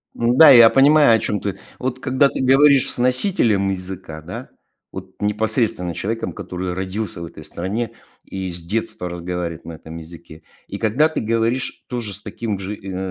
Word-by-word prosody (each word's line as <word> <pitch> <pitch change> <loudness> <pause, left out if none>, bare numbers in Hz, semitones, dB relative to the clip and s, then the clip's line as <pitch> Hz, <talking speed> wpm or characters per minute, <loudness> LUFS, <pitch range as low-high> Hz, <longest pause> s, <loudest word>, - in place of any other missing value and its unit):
Н-да, 125 +7 +6
я 120 -3 +9
понимаю, 145 -1 +5
о - - +1
чём 105 -1 -1
ты. 100 -2 -4 0.2
Вот 130 0 -3
когда 130 +1 +3
ты - - -4
говоришь 135 +1 +5
с - - -5
носителем 120 - +1
языка, 90 -4 -6
да, - - -8 0.4
вот 95 +2 -10
непосредственно 105 -4 -1
человеком, 110 -4 -3
который 90 0 -5
родился 95 0 -4
в - - -5
этой 75 -2 -11
стране 105 +7 -4 0.3
и 95 -2 -5
с 85 - -4
детства 110 +1 -3
разговаривает 85 -1 -5
на 85 - -8
этом 80 +1 -11
языке, 80 -1 -12 0.2
и - - -6
когда 125 +9 +2
ты 160 - -4
говоришь 115 +3 -1
тоже 120 -5 -4
с 105 - -11
таким 105 -4 -4
же 100 +2 -5
ин 95 -2 -7
105 Hz, 175 wpm, -20 LUFS, 90-120 Hz, 0.4 s, я